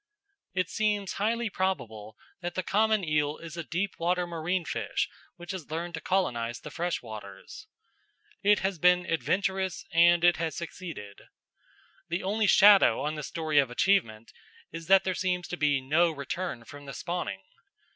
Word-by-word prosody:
It 185 -2 +1
seems 210 -1 -1
highly 230 +3 0
probable 110 - -3 0.2
that 175 0 -4
the 185 - -1
common 215 +2 +2
eel 150 -2 0
is 165 -1 -9
a 170 - -4
deep 180 +6 -3
water 180 +1 +1
marine 170 +1 -2
fish - - -2 0.3
which 175 +2 -8
has 185 -7 -7
learned 170 +2 -4
to 160 - -5
colonise 120 -11 -1
the - - -9
freshwaters. 110 - -6 0.7
It 205 0 +4
has 190 -3 -1
been 180 +1 +4
adventurous 190 +2 -1
and 170 +1 +5
it 175 0 +5
has 165 -2 -2
succeeded. 165 - -8 0.9
The 170 +3 -2
only 210 +3 +1
shadow 200 - +7
on 150 +1 -1
the 155 - -5
story 155 -1 0
of 135 -3 +2
achievement 120 - +1 0.4
is 165 0 -8
that 195 +1 +6
there 185 - -1
seems 180 +1 -1
to - - -3
be 145 -4 +1
no 155 +6 +3
return 155 -3 -5
from 145 +3 -12
the 140 - -6
spawning. 170 - -4
175 Hz, 160 wpm, -28 LUFS, 150-190 Hz, 0.9 s, shadow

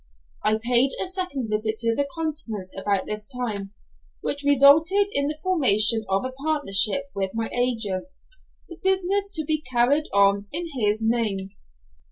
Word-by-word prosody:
I 215 0 +2
paid 245 +4 +2
a - - +1
second 360 - -3
visit 215 +1 -1
to 230 -1 +1
the 280 +4 -2
Continent 265 - -5
about 195 0 -1
this 210 0 -4
time, 215 -5 -5 0.5
which 285 - -2
resulted 305 +8 +4
in 280 0 +2
the 300 +1 -3
formation 225 - +3
of 195 +4 0
a 260 - -4
partnership 280 -2 +2
with 195 +1 -4
my 225 0 -2
agent, 230 -4 -2 0.6
the 340 - -12
business 385 +1 0
to 315 -2 +1
be 310 0 -1
carried 260 +5 +2
on 200 0 +2
in 335 +2 -3
his 215 -2 0
name. 215 -4 -1
245 Hz, 155 wpm, -23 LUFS, 210-305 Hz, 0.6 s, resulted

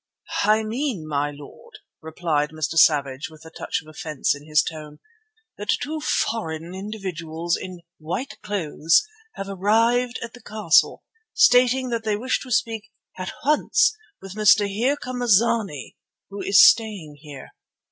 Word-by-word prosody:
"I 215 +1 +3
mean, 220 - -3
my 145 -1 -1
lord," 145 0 -13 0.2
replied 160 -2 -1
Mr. 155 0 -3
Savage 145 -5 +3
with 160 0 -16
a 160 - -12
touch - - -4
of - - -21
offence 155 -2 -2
in 145 +1 -14
his 150 0 +3
tone, 150 -2 -8 0.6
"that 205 - 0
two 310 +2 -4
foreign 170 - -2
individuals 175 -5 -4
in 180 -2 -8 0.2
white 180 - -5
clothes 185 - +1 0.3
have 195 - -6
arrived 230 +6 +1
at 230 - -8
the 245 - -14
castle, 210 -6 +2 0.3
stating 250 +1 +4
that 230 -1 -2
they 215 -1 0
wish 255 +4 -1
to 260 - -10
speak 225 -2 -1 0.3
at 185 - -4
once 305 +9 +3 0.2
with 195 - -10
a - - -13
Mr. 210 0 +5
Here 235 +9 0
come 250 -2 -6
a 245 - -1
zany 210 - +1 0.4
who 200 - -6
is 250 +6 +7
staying 205 -12 +1
here. 145 -3 -11
195 Hz, 155 wpm, -23 LUFS, 155-230 Hz, 0.6 s, is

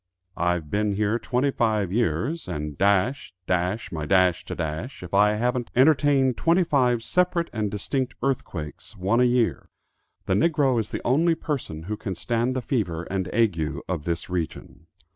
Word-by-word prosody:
I've 85 -3 -1
been 105 0 +1
here 105 +3 0
twenty 130 +4 0
five 110 -7 0
years, 120 - -1
and 75 -1 -4
dash, 100 - +1
dash 90 +4 -1
my 75 -2 -4
dash 95 -1 +3
to - - -5
dash, 80 - -4
if 90 - -9
I 105 +1 +5
haven't 120 +2 -1
entertained 135 -2 +4
twenty 170 +3 +3
five 125 -7 +2
separate 180 +1 +1
and 110 -3 -1
distinct 125 +6 -2
earthquakes, 95 - -4
one 100 +6 +1
a - - +5
year. 120 - +1 0.6
The 95 - +1
niggro 135 - +2
is 110 -1 -2
the - - -5
only 165 +7 +3
person 125 - -4
who 105 +5 -4
can 95 -4 -4
stand 115 +9 -1
the 130 - -2
fever 90 - -1
and 95 -1 -1
ague 105 -8 +2 0.3
of 85 -5 -3
this 85 0 -2
region." 85 -1 -5
110 Hz, 165 wpm, -25 LUFS, 90-130 Hz, 0.6 s, I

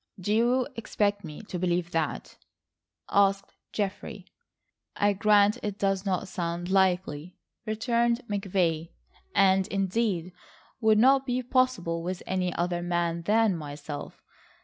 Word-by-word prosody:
"Do 205 +3 -1
you 245 +3 +2
expect 205 -2 -1
me 155 +3 -8
to 185 -4 -6
believe 175 -1 0
that?" 160 -2 -2 0.8
asked 195 0 +2 0.2
Geoffrey. 205 -1 -4 0.7
"I 205 0 +2
grant 210 +2 +4
it 205 -1 -4
does 195 -1 0
not 190 +1 -1
sound 175 -1 -4
likely," 180 -4 +1 0.3
returned 235 +2 +1
McVay, 180 -5 -1 0.5
"and 190 -1 +4
indeed 195 -3 -1 0.5
would 220 -2 +4
not 265 +4 +4
be 250 0 -1
possible 245 -10 +1
with 180 +1 -4
any 185 -1 -1
other 175 0 -1
man 175 -1 -1
than 210 +2 +2
myself. 145 -1 -7
195 Hz, 125 wpm, -27 LUFS, 175-215 Hz, 0.8 s, grant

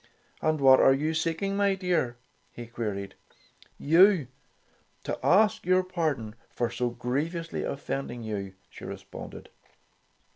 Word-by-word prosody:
"And 155 -1 +1
what 130 -1 +7
are 135 - +6
you 155 +3 -1
seeking, 165 +5 -1
my 200 -1 +2
dear?" 175 -10 -1 0.3
he 120 - -8
queried. 105 -4 -5 0.6
"You, 165 - +4 0.7
to - - -4
ask 205 +2 +4
your 185 +1 +3
pardon 155 -12 -2 0.2
for 120 -1 -2
so 120 +1 -1
griev 125 +8 -2
ously 165 -1 -4
offending 135 -3 -4
you," 100 -3 -5 0.2
she - - -12
responded. - - -9
140 Hz, 125 wpm, -27 LUFS, 120-175 Hz, 0.7 s, what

